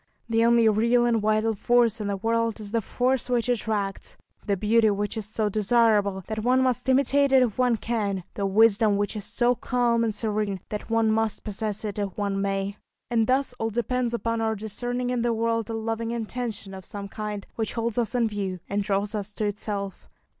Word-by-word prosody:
The 225 0 +2
only 235 -1 +5
real 235 +3 +3
and 230 -2 +2
vital 215 +1 +2
force 230 +1 +2
in 205 - -2
the 200 -1 -1
world 230 +2 0
is 205 -2 -7
the 230 0 +1
force 250 +4 0
which 245 -1 +1
attracts, 215 -5 -2 0.3
the 200 -1 0
beauty 220 +2 +3
which 205 0 -1
is 215 -2 -3
so 215 0 0
desirable 210 -2 +2
that 220 0 -4
one 250 +4 +3
must 255 0 0
imitate 280 +1 +3
it 265 -1 +6
if 235 -1 -2
one 250 -2 +3
can, 205 -5 -2
the 200 -1 -1
wisdom 215 0 +4
which 205 +2 -1
is 205 -2 -5
so 245 0 +2
calm 240 -1 +1
and 225 - +1
serene 210 -2 -1
that 210 +1 -5
one 225 -1 +2
must 220 -1 0
possess 210 0 -3
it 210 -1 -4
if 200 -2 -3
one 200 -1 -1
may. 195 0 -2 0.3
And 225 -2 +2
thus 265 0 +1
all 225 - 0
depends 240 +2 -1
upon 230 -1 -1
our 220 0 0
discerning 245 +4 -3
in 245 -1 0
the 235 0 +1
world 230 -1 -1
a - - -3
loving 225 +1 -2
intention 230 -3 -4
of 190 0 -8
some 200 +1 -7
kind, 210 -1 -5
which 220 -2 -3
holds 230 0 -1
us 235 0 -1
in 235 -2 +3
view, 195 -3 -3
and 205 +1 -1
draws 200 +1 -1
us 210 -1 -3
to 215 - -2
itself. 205 -1 -4
220 Hz, 205 wpm, -25 LUFS, 205-235 Hz, 0.3 s, it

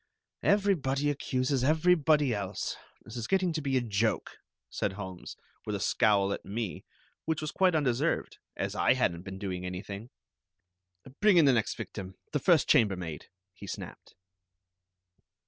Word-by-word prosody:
"Everybody 145 -9 +2
accuses 130 -1 -1
everybody 155 -3 +3
else. 100 -2 -3 0.3
This 115 - -11
is 115 - -4
getting 185 -3 +2
to 155 - -2
be 135 -2 0
a - - +2
joke," 110 -1 -1 0.3
said - - -2
Holmes, 95 -3 -8 0.3
with - - -3
a - - -3
scowl 100 -2 +2
at - - -6
me, 105 -2 -4 0.4
which 160 -1 0
was 155 -1 -3
quite 185 -3 +3
undeserved, 145 +1 0 0.2
as - - -2
I - - +3
hadn't 85 0 0
been 95 +1 -8
doing 95 -2 -4
anything. 100 +5 -6 1.1
"Bring 210 -3 +5
in 165 - +7
the 135 - +6
next 115 -3 0
victim, 95 -2 -7 0.2
the 145 - 0
first 165 +1 +4
chambermaid," 90 -9 +1 0.3
he 100 +2 -11
snapped. - - -8
125 Hz, 145 wpm, -30 LUFS, 100-155 Hz, 1.1 s, in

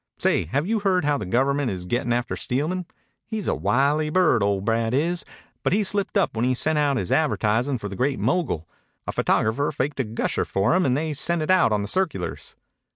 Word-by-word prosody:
"Say, - - +1
have 140 - -1
you 220 +3 0
heard 185 -5 +1
how 145 -1 +1
the - - -5
Government 135 +5 +1
is 90 -3 -5
gettin' 120 +5 -1
after 120 0 -1
Steelman? 165 +8 -2 0.4
He's 220 -4 -4
a - - +2
wily 145 +4 +1
bird, 155 - +3
old 100 -1 0
Brad 115 +1 +1
is, 170 +5 0 0.4
but - - +1
he 210 +2 +2
slipped 200 +1 -1
up 190 - +1
when 110 - 0
he 130 +1 +2
sent 155 +4 +1
out 145 -2 +2
his 95 - -3
advertisin' 125 -3 +1
for 105 - -5
the 100 - -7
Great 130 +5 0
Mogul. 130 - -1 0.4
A - - -2
photographer 115 +7 +1
faked 145 0 -3
a - - +2
gusher 110 0 -2
for 95 +8 +1
him 185 -2 +2
and 130 +1 +2
they 155 0 -2
sent 165 +3 +1
it 155 - +1
out 185 -10 +4
on 105 -1 +1
the - - -4
circulars." 160 - -2
140 Hz, 220 wpm, -24 LUFS, 115-170 Hz, 0.4 s, out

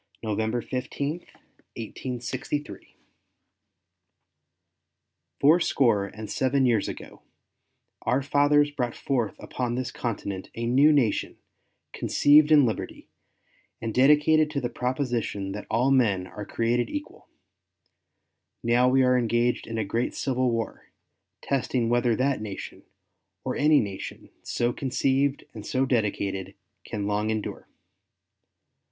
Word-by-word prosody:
NOVEMBER 110 +2 -1
15, 140 +5 -3 0.6
1863 125 +5 -5 2.4
Fourscore 140 - +3
and 110 +2 -8
seven 130 +4 +1
years 115 -5 +2
ago - - -9 0.8
our 130 +2 +1
fathers 145 +1 +3
brought 125 -5 -3
forth 120 -7 -1
upon 125 -2 -3
this 130 0 -3
continent 100 -5 -4
a 115 - -3
new 135 +6 +5
nation, 135 -8 +1 0.6
conceived 150 +1 +4
in 145 -3 +7
liberty, 110 - -4 0.7
and 115 -1 -4
dedicated 150 +4 +4
to 150 -2 -2
the 125 -2 -3
proposition 125 -6 -2
that 105 +1 -7
all 125 +5 +2
men 105 -9 +3
are 105 +2 -8
created 120 +1 0
equal. 295 0 -7 1.4
Now 120 +2 +3
we 130 +1 +4
are 125 0 +4
engaged 120 +1 0
in 115 - -4
a 110 - -1
great 115 +5 -2
civil 130 -1 0
war, 115 -1 -4 0.5
testing 125 -3 0
whether 120 -1 +2
that 130 -2 0
nation, 105 -3 -7 0.6
or - - -2
any 150 0 +4
nation 100 -3 -6
so 120 0 -1
conceived 135 +2 0
and 105 - -8
so 130 +4 0
dedicated, 100 -6 -1 0.3
can 105 -2 -4
long 105 +1 0
endure. 110 -1 -4
125 Hz, 115 wpm, -26 LUFS, 110-135 Hz, 2.4 s, in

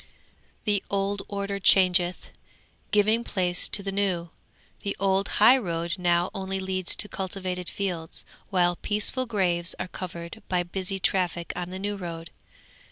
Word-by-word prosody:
'The 205 -2 +2
old 200 0 0
order 200 0 -3
changeth, 180 -2 +4 0.6
giving 215 +3 +3
place 180 -5 0
to 200 - +1
the 195 - -2
new. 185 -4 0 0.5
The 200 - -2
old 195 0 +2
high 245 +6 +8
road 170 -5 -2
now 175 0 +2
only 195 0 -2
leads 190 -1 +1
to - - +1
cultivated 185 -2 -4
fields, 175 -5 -3 0.2
while 175 -2 +3
peaceful 215 +5 -1
graves 180 -5 +1
are - - -3
covered 175 +3 -7
by 180 -1 +2
busy 190 +2 -2
traffic 180 -2 0
on 175 0 -4
the 185 - -5
new 205 +1 -3
road. 165 -3 -6
190 Hz, 145 wpm, -26 LUFS, 175-200 Hz, 0.6 s, high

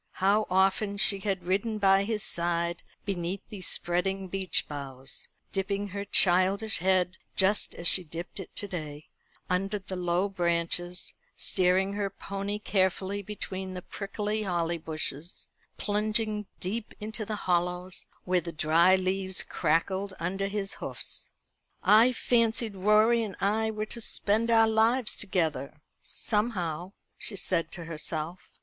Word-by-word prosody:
How 200 +3 +2
often 195 +2 +2
she 200 -1 +5
had 195 -2 -2
ridden 200 +5 0
by 195 -1 +4
his 215 -1 -1
side 170 0 +1 0.2
beneath 185 -1 -3
these 195 -4 -6
spreading 190 +2 0
beech 190 -2 -1
boughs, 135 -2 -5 0.2
dipping 200 +1 -2
her 200 +1 -4
childish 195 +3 +3
head, 185 0 +2 0.2
just 200 +2 +2
as 170 - 0
she 185 - +8
dipped 170 +4 -7
it 190 - -7
to 205 - -3
day, 155 -5 -7 0.4
under 195 +3 0
the 190 -1 -6
low 180 +1 +1
branches, 175 -1 -1 0.2
steering 190 +2 +2
her 200 -1 -1
pony 200 +1 -4
carefully 195 -1 0
between 190 -2 -5
the 180 - -6
prickly 210 +1 -3
holly 170 -4 -1
bushes, 160 0 -4 0.3
plunging 210 0 0
deep 210 +4 -4
into 220 +1 -4
the 215 +1 -3
hollows 180 +1 0 0.2
where 180 -1 +2
the 170 +1 -6
dry 165 +4 +4
leaves 190 0 -1
crackled 190 +4 0
under 195 +3 -1
his 195 -1 -2
hoofs. - - -1 0.5
"I 225 +4 +7
fancied 230 -3 +1
Rorie 215 +4 +4
and 210 -4 -4
I 215 +3 +1
were 215 -1 -3
to 235 +2 -5
spend 220 +1 +1
our 225 -1 +6
lives 220 +2 +2
together 155 -7 -1 0.2
somehow," 190 -5 -2 0.3
she 210 - -2
said 170 -3 0
to 170 - -4
herself. 165 +1 -3
190 Hz, 140 wpm, -29 LUFS, 175-210 Hz, 0.5 s, she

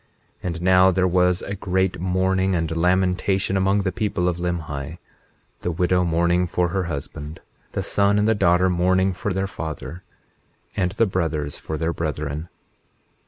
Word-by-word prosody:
21:9 - - -3
And 85 -1 -4
now 95 0 +6
there 95 0 +2
was 90 0 +2
a 100 - -4
great 95 -1 -1
mourning 95 +1 +1
and 80 -1 -1
lamentation 95 +2 +1
among 95 +1 +2
the 95 - 0
people 90 -1 -1
of 90 -1 0
Limhi, 80 -4 -4 0.6
the - - -3
widow 90 +1 +1
mourning 85 +1 +2
for 90 0 0
her 95 +2 -1
husband, 75 0 -6 0.3
the - - -2
son 100 0 +2
and 105 +1 +2
the 110 - +4
daughter 90 -2 +3
mourning 95 +1 +2
for 100 +3 -3
their 95 +1 -1
father, 80 -3 -6 0.7
and 90 -1 0
the 115 - +3
brothers 80 -7 -2
for 80 - -5
their 80 +2 -1
brethren. 75 0 -4
90 Hz, 165 wpm, -23 LUFS, 85-95 Hz, 0.7 s, now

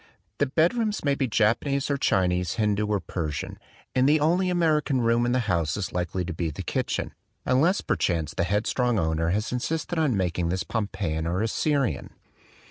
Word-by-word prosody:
The 145 - +2
bed 160 - +3
rooms 220 -7 -1
may 140 - +3
be 135 -1 0
Japanese 130 +6 +1
or - - +2
Chinese, 90 -8 +1
Hindu 105 -1 0
or 105 -1 +1
Persian; 80 -4 -4 0.3
and 130 +2 +3
the 155 +1 +4
only 175 +5 +2
American 155 -6 +2
room 115 +1 +2
in - - +1
the 125 0 +2
house 85 -5 0
is 100 - -4
likely 90 +1 -2
to 90 - -4
be 80 0 -2
the 75 - -6
kitchen, - - -2 0.3
unless 155 +10 +3
per - - 0
chance 85 -4 -1
the - - 0
headstrong 110 +5 +1
owner 80 -1 0
has 105 +5 -1
insisted 160 +7 -2
on 140 -9 +2
making 90 -2 0
this 95 +1 -1
Pompeian 85 -7 -2
or 90 +5 0
Assyrian. 140 +4 -1
110 Hz, 185 wpm, -26 LUFS, 90-140 Hz, 0.3 s, the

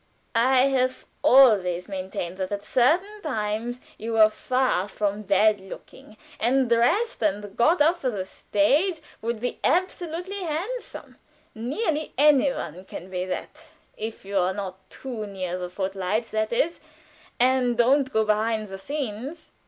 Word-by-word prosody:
_ - - -40 0.3
I 250 +3 +4
have 255 -1 0 0.2
always 200 -9 +5
maintained 185 -2 -5
that 190 0 -3
at 200 0 -3
certain 345 - +1
times 230 - -2 0.2
you 225 +1 -4
were 215 -1 +6
far 255 -6 0
from 205 0 -2
bad 205 +1 +3
looking, 195 +2 -12 0.2
and 260 +1 +2
dressed 240 - +2
and 205 -1 -1
got 315 +8 +3
up 335 +4 +4
for 260 - 0
the 200 -5 -3
stage, 290 - +1 0.2
would 230 0 -2
be 245 +2 -3
absolutely 360 +1 -1
handsome. 365 +10 -5 0.4
Nearly 300 - -2
any 285 -1 +5
one 180 - -6
can 185 +1 -9
be 180 0 -2
that 185 - -6 0.3
if 220 -2 -6
you 200 0 0
are 185 +1 +1
not 190 -1 -7
too 235 -5 -6
near 185 -2 -4
the 180 0 -4
foot 190 +1 -3
lights, 195 +4 -2
that 215 0 -1
is, 325 +8 0 0.6
and 250 -1 +3
don't 260 +3 +3
go 220 0 +2
behind 215 0 0
the 195 0 -7
scenes." 275 - -5
225 Hz, 155 wpm, -25 LUFS, 200-270 Hz, 0.6 s, were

